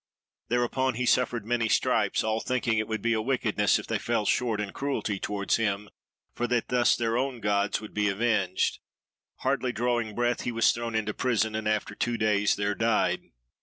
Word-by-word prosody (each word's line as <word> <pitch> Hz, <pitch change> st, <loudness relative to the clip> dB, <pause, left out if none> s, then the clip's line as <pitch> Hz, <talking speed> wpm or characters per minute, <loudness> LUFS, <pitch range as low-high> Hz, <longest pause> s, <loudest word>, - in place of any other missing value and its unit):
Thereupon 120 Hz, +1 st, 0 dB
he 125 Hz, +2 st, -1 dB
suffered 120 Hz, -3 st, +1 dB
many 115 Hz, -1 st, 0 dB
stripes, -, -, +2 dB
all 110 Hz, 0 st, 0 dB
thinking 120 Hz, -2 st, 0 dB
it 110 Hz, -, -2 dB
would 110 Hz, -2 st, -3 dB
be 115 Hz, 0 st, +2 dB
a 110 Hz, -, 0 dB
wickedness 110 Hz, -4 st, +1 dB
if -, -, -6 dB
they -, -, -1 dB
fell -, -, -1 dB
short 115 Hz, -4 st, +1 dB
in 100 Hz, -2 st, -3 dB
cruelty 135 Hz, -8 st, -2 dB
towards 100 Hz, -1 st, 0 dB
him, 105 Hz, -2 st, -1 dB, 0.4 s
for 120 Hz, -, -2 dB
that 120 Hz, -1 st, 0 dB
thus 125 Hz, -1 st, +3 dB
their 115 Hz, 0 st, 0 dB
own 130 Hz, -2 st, -2 dB
gods 100 Hz, -1 st, 0 dB
would 110 Hz, -, -10 dB
be 105 Hz, -1 st, +1 dB
avenged. 100 Hz, -3 st, 0 dB, 0.6 s
Hardly 130 Hz, -1 st, 0 dB
drawing 120 Hz, -3 st, -1 dB
breath, 120 Hz, 0 st, 0 dB
he 120 Hz, -, -2 dB
was 115 Hz, -1 st, +4 dB
thrown 115 Hz, -1 st, -4 dB
into 110 Hz, -1 st, -1 dB
prison, 110 Hz, -3 st, 0 dB
and 110 Hz, 0 st, -2 dB
after 105 Hz, -1 st, 0 dB
two 120 Hz, +3 st, -1 dB
days 105 Hz, -2 st, +2 dB
there 100 Hz, 0 st, 0 dB
died. 115 Hz, +1 st, 0 dB
115 Hz, 190 wpm, -27 LUFS, 105-120 Hz, 0.6 s, was